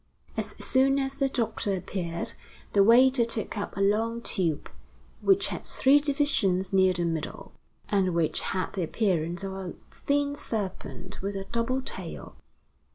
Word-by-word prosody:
As - - -3
soon 270 +1 +3
as 270 +1 -2
the 275 -1 +2
doctor 225 -5 -1
appeared, 170 -2 -3 0.4
the 200 - +6
waiter 250 +3 +6
took 230 -2 -3
up 205 -1 -4
a - - 0
long 220 +4 +2
tube, 165 -6 -1 0.5
which 390 0 +3
had - - -5
three 275 +2 +4
divisions 275 -11 +1
near 190 -1 +5
the 175 -1 -1
middle, 165 -2 -4 0.4
and 190 -4 +1
which 165 -2 +1
had 185 -1 -2
the 195 - -2
appearance 175 -1 0
of 195 -1 -4
a 190 -2 -6 0.2
thin 285 0 0
serpent 205 -7 -5
with 200 +1 -3
a 195 - -3
double 255 +3 0
tail. - - -5
205 Hz, 155 wpm, -28 LUFS, 185-265 Hz, 0.5 s, the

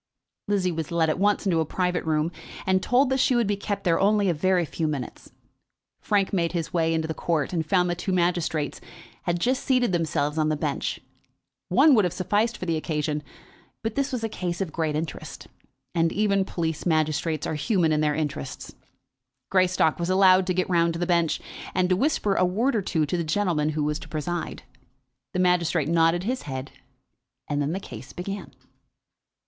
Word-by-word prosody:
Lizzie 195 -3 +1
was 160 -2 -4
led 165 -2 +2
at 155 - -3
once 205 +1 +2
into 175 -4 +2
a 160 - +1
private 180 0 -1
room, 155 +1 +1 0.3
and 185 0 +2
told 255 +6 +3
that 265 - +2
she 255 - +3
would 240 -1 +3
be 205 0 0
kept 200 0 -4
there 170 -2 +2
only 205 0 +3
a - - +3
very 180 +2 +2
few 160 +1 -2
minutes. 140 -5 -5 0.7
Frank 200 -2 +1
made 170 -3 +1
his 165 -3 -3
way 165 -2 +2
into 160 -1 0
the 160 - -2
court 160 0 -1
and 165 -2 0
found 180 +2 +2
that 175 0 -2
two 190 - -2
magistrates 175 -4 0 0.4
had 175 0 0
just 255 +8 0
seated 250 -5 +2
themselves 160 -3 0
on 155 0 +2
the 155 - +1
bench. - - -2 0.7
One 310 - +6
would 215 -5 +5
have 180 - -1
sufficed 210 +5 0
for - - -5
the 165 -2 0
occasion; 150 -1 -2 0.6
but 225 -1 -2
this 280 +2 -1
was 250 -3 -3
a - - +1
case 180 -5 -4
of 190 -5 -2
great 160 -2 -1
interest, 155 -1 -5 0.5
and 165 -1 +2
even 200 -1 +1
police 160 -4 -3
magistrates 155 -1 0
are - - -2
human 165 +1 +1
in 155 0 +2
their 150 -1 +1
interests. 145 - -4 0.8
Greystock 185 -4 +3
was 170 +1 -1
allowed 185 0 +5
to 185 - +1
get 185 - +1
round 170 -2 +2
to 165 - -5
the 175 - 0
bench, 170 -2 +1 0.4
and 185 -1 +2
to 185 - +4
whisper 210 -3 +1
a 185 - +2
word 225 +9 +1
or 215 - +2
two 160 -4 0
to 160 +5 -2
the 170 - -1
gentleman 160 -3 0
who 155 -1 -1
was 150 +1 -1
to - - -11
preside. 165 +2 -4 0.7
The 185 - -1
magistrate 175 -4 +2
nodded 165 +1 +3
his 250 +5 -2
head, 130 -1 -6 0.8
and 145 0 -1
then 145 +3 -1
the 190 - -2
case 130 - -10
began. 195 +3 -6
175 Hz, 200 wpm, -25 LUFS, 160-195 Hz, 0.8 s, One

